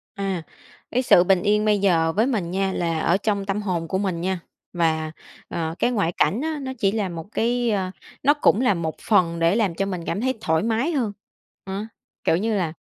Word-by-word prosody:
À, 195 -4 -2 0.5
cái 250 - +2
sự 180 -8 +6
bình 185 -1 +3
yên 210 0 +2
bây 210 -1 +3
giờ 165 -4 +3
với 220 +3 +3
mình 210 -10 -1
nha, 190 0 0
là 165 -2 -1
ở 170 +3 +2
trong 200 -1 -1
tâm 200 +1 -1
hồn 175 -5 -2
của 190 - -1
mình 185 -4 -1
nha 185 0 -1 0.3
và, 160 -2 0 0.4
ờ, 165 -1 -3
cái 245 - +2
ngoại 200 -8 +1
cảnh 220 +7 +2
á 315 0 -2
nó 260 -1 -4
chỉ 195 -2 +3
là 205 -3 -1
một 165 -2 -6
cái 240 +1 +1
ơ, 190 -2 -1 0.3
nó 290 +2 +6
cũng 260 -6 +3
là 225 -6 +4
một 165 -2 -3
phần 170 -6 +3
để 165 +3 +3
làm 205 -7 +1
cho 195 +3 0
mình 180 -4 -4
cảm 200 +6 -2
thấy 260 +1 +1
thoải 160 +1 +1
mái 230 +8 +1
hơn, 245 -9 0 0.5
ớ. 195 +2 -4 0.4
Kiểu 165 - +3
như 220 +3 0
là 170 -5 -1
195 Hz, 225 wpm, -23 LUFS, 170-220 Hz, 0.5 s, sự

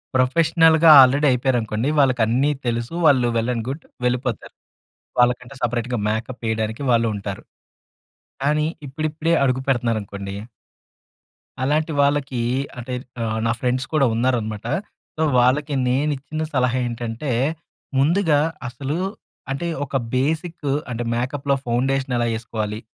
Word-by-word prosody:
ప్రొఫెషనల్‌గా 160 +4 +4
ఆల్రెడీ 140 +3 +4
అయిపోయారనుకోండి, 120 -1 0
వాళ్ళకి 130 -4 +3
అన్నీ 135 +6 +2 0.2
తెలుసు. 120 +4 -2
వాళ్ళు 130 -4 +4
వెల్ 115 +2 0
అండ్ 115 0 -3
గుడ్. 145 +4 -5 0.2
వెళ్ళిపోతారు. 125 -2 -2 0.7
వాళ్ళకంటే 125 +2 +1
సెపరేట్‌గా 120 0 -1
మేకప్ 115 +3 -3
ఏయడానికి 110 +3 -2
వాళ్ళుంటారు. 105 -4 -1 1.0
కానీ, 150 +2 +2 0.2
ఇప్పుడిప్పుడే 155 +4 -1
అడుగు 130 0 +1
పెడుతున్నారనుకోండి 105 -6 -1 1.3
అలాంటి 155 +3 +1
వాళ్ళకీ, 140 -3 +1 0.4
అంటే 125 +1 -5 0.3
ఆహ్, 110 0 -1
నా 115 - +2
ఫ్రెండ్స్ 130 +2 0
కూడా 140 -4 +4
ఉన్నారనమాట. 115 -3 -1 0.5
సో 160 - -1 0.2
వాళ్ళకి 140 +4 +2
నేను 145 +4 +1
ఇచ్చిన 155 +3 -5
సలహా 125 -1 +2
ఏంటంటే, 120 +3 -4 0.7
ముందుగా 155 0 +3 0.3
అసలు 135 +5 -4 0.6
అంటే 170 +5 -3 0.2
ఒక 140 - -12 0.2
బేసిక్ 160 +3 -1 0.2
అంటే, 120 0 -3
మేకప్‌లో 135 +3 -1
ఫౌండేషన్ 130 +2 0
ఎలా 120 - +1
ఎసుకోవాలి. 110 -1 -4
130 Hz, 115 wpm, -22 LUFS, 115-145 Hz, 1.3 s, ప్రొఫెషనల్‌గా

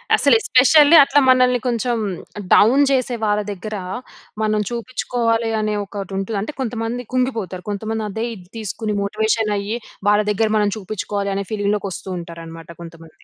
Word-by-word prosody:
అసలు 280 -4 +4
ఎస్పెషల్లీ 290 +6 +6
అట్లా 280 +1 +3
మనల్ని 255 -1 +4
కొంచెం 240 0 0 0.6
డౌన్ 255 +7 +6
చేసే 255 -2 +1
వాళ్ళ 210 0 +1
దగ్గర 205 +2 -6 0.7
మనం 215 0 +1
చూపించుకోవాలి 235 -1 -1
అనే 215 0 -1
ఒకటి 195 -1 -7
ఉంటది. 195 +2 -3
అంటే 290 +9 -5
కొంతమంది 235 0 -3
కుంగిపోతారు. 225 -8 -2
కొంతమంది 220 +1 -3
అదే 220 +3 -3
ఇది 180 -3 -14
తీసుకొని 215 0 -3
మోటివేషన్ 215 +1 0
అయ్యి 205 +4 -3 0.3
వాళ్ళ 210 0 +4
దగ్గర 215 +1 +1
మనం 205 -1 +2
చూపించుకోవాలి 200 0 -3
అనే 200 0 -2
ఫీలింగ్ 205 -1 0
లోకి 200 -1 -4
వస్తూ 190 - -8
ఉంటారు 170 -1 -9
అన్నమాట 165 0 -10
కొంతమంది. 165 -1 -13
215 Hz, 155 wpm, -20 LUFS, 200-240 Hz, 0.7 s, ఎస్పెషల్లీ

